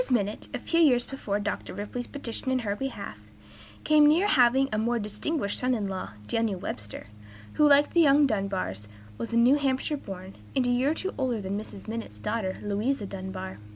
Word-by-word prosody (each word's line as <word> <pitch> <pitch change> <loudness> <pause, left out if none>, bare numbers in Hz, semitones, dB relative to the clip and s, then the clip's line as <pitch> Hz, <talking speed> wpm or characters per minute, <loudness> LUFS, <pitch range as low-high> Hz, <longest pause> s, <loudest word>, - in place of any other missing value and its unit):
Minott, 210 -4 0
a - - -2
few 335 - 0
years 250 -7 +5
before 210 -7 -3
Dr. 205 0 -4
Ripley's 225 +4 -5
petition 260 -2 -4
in 260 - +2
her 200 0 0
behalf, 270 +5 -5 0.6
came 300 -1 +6
near 325 +6 +4
having 265 -5 +4
a 215 - +1
more 235 +2 +1
distinguished 210 +2 -2
son 255 0 +2
in 210 -3 -2
law, 190 - -5
Daniel 215 - 0
Webster, 105 - -6 0.5
who, 300 -1 +5
like 285 +1 +5
the 340 - +5
young 290 -1 +6
Dunbars, 195 - -2 0.3
was 115 - -4
New 240 +4 +5
Hampshire 275 +1 0
born, 190 -5 -8 0.2
and 260 -2 +2
a 245 - +2
year 250 +3 +2
or 315 - 0
two 380 +3 -3
older 250 -4 0
than 195 0 -3
Mrs. 205 -1 -7
Minott's 225 - -5
daughter, 190 - -2
Louisa 210 +4 -1
Dunbar. 190 - -6
230 Hz, 190 wpm, -27 LUFS, 200-270 Hz, 0.6 s, came